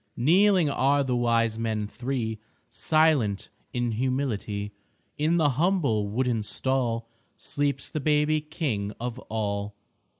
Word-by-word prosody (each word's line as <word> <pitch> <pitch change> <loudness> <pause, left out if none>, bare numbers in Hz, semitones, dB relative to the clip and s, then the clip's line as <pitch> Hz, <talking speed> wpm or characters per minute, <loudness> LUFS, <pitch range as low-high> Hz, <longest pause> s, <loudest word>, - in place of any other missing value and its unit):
Kneeling 180 +6 +4
are 140 0 +2
the 130 -2 -1
Wise 115 -2 +1
Men 110 -2 -1
Three, 120 -1 -3 0.3
Silent 155 -11 +2 0.2
in 120 -1 -1
humility. 110 -4 -2 0.5
In 160 +3 +2
the 155 -3 +4
humble 140 - +1
wooden 120 +1 0
stall 115 0 -1 0.3
Sleeps 140 -2 -2
the 155 - -2
baby 150 +1 +2
King 115 - -3
of 120 +1 -4
all. 100 -2 -2
125 Hz, 120 wpm, -26 LUFS, 110-150 Hz, 0.5 s, Kneeling